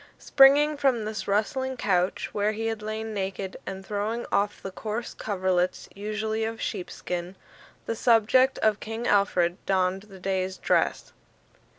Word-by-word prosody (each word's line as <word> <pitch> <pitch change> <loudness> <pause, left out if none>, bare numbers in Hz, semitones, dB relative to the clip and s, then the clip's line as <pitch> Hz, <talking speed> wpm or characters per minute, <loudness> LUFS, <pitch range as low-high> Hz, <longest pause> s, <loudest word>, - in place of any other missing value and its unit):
Springing 290 +2 +5
from 255 -6 +1
this 215 0 -4
rustling 260 +6 0
couch, 180 -5 0
where 210 +1 +1
he 225 +1 -4
had 225 -1 -2
lain 220 +1 -4
naked, 190 -1 -4
and 190 0 -6
throwing 215 +4 -2
off 205 +1 +1
the 195 - -7
coarse 220 +4 -4
coverlets, 185 -3 -1
usually 215 +2 -2
of 225 0 -3
sheepskin, 180 -2 -4 0.5
the 230 - -2
subject 240 +3 +4
of 215 -1 +3
King 225 +2 -5
Alfred 185 -4 +2
donned 190 0 +1
the 195 - -11
day's 190 0 -2
dress. - - 0
210 Hz, 145 wpm, -26 LUFS, 190-225 Hz, 0.5 s, Springing